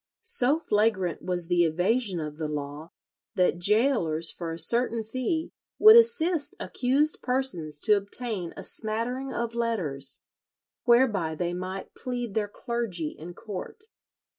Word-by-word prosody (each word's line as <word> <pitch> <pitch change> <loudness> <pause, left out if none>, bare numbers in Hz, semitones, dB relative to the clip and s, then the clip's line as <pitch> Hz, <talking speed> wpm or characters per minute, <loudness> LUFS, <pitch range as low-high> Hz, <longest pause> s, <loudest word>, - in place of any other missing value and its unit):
So 305 - +4
flagrant 210 - 0
was 175 -2 -2
the 175 -1 +3
evasion 180 +4 +1
of 150 0 -6
the 155 - -2
law, 150 +1 -5 0.5
that 180 -1 +2
gaolers 205 - +2
for 170 -2 -6
a 165 - -5
certain 230 +6 +1
fee 255 +8 -2 0.3
would 435 +1 +9
assist 365 -10 +3
accused 275 +5 0
persons 215 - -2
to 210 - +4
obtain 200 -3 -4
a - - -7
smattering 235 +5 -2
of 235 -1 -3
letters, 170 - -1 0.7
whereby 225 -10 +3
they 175 +2 -2
might 185 +2 -6
plead 245 -4 -4
their 210 -1 0
"clergy" 205 -7 -3
in 170 +4 -10
court. 210 - -8
210 Hz, 135 wpm, -27 LUFS, 170-250 Hz, 0.7 s, would